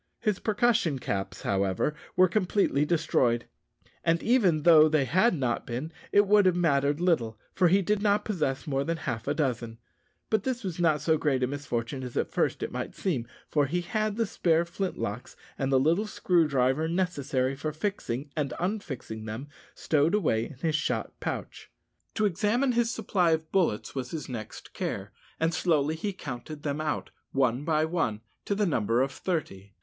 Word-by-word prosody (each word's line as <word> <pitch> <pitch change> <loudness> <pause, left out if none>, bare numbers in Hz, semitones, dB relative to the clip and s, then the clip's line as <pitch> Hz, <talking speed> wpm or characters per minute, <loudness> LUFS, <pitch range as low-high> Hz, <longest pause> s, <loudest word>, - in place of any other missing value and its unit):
His 210 -3 0
percussion 215 - +2
caps, 100 -6 -4
however, 100 +7 0 0.2
were 185 0 +6
completely 185 -6 +1
destroyed; 130 -8 +1 0.6
and 165 0 +2
even 195 - +3
though 155 -2 +7
they 150 -3 +2
had 185 - +3
not 125 -5 -1
been, 125 +7 -4 0.2
it 205 0 +5
would 205 -1 +5
have 180 - +3
mattered 145 -4 +2
little, 140 -12 +1 0.2
for 185 - +4
he 190 +3 +4
did 210 +2 +1
not 205 0 +2
possess 160 -10 -1
more 135 -3 0
than 165 +2 -2
half 115 -7 -4
a 145 - +1
dozen. 120 -6 -2 0.5
But 220 -2 +3
this 255 +1 -3
was 180 -3 -4
not 155 -4 +3
so 160 +1 +2
great 135 -4 +1
a - - +2
misfortune 130 -2 -3
as 125 -2 -6
at - - 0
first - - 0
it - - -3
might - - -5
seem, 135 -12 -2 0.2
for 145 -2 +1
he 175 +5 -1
had 215 +3 -1
the 230 0 +1
spare 170 -4 +1
flint 185 +2 -3
locks 110 +5 -5 0.2
and 135 0 -1
the 135 - +5
little 170 +10 +2
screw 175 -5 +2
driver 135 +2 +1
necessary 140 -7 0
for 155 +3 -3
fixing 150 - -3
and 140 -5 -2
unfixing 150 - -4
them 115 +7 -6 0.3
stowed 155 +4 +2
away 115 - +1
in 150 - -12
his 160 -2 +1
shot 155 - -2
pouch. - - -5 0.5
To 215 - +2
examine 210 +8 +1
his 235 -1 +2
supply 190 -8 +1
of 160 0 -3
bullets 165 - +1
was 130 -2 -4
his 155 -1 -5
next 115 -4 -8
care, - - -4 0.3
and 165 +1 +1
slowly 155 -3 +1
he 200 +6 -3
counted 145 -2 -7
them 145 +1 -2
out, 155 - -2 0.2
one 130 -1 +1
by 155 0 +2
one, 160 -11 -1 0.2
to 200 - 0
the 205 +1 +1
number 120 - +2
of 135 - -2
thirty. 100 - -4
155 Hz, 185 wpm, -28 LUFS, 130-185 Hz, 0.6 s, though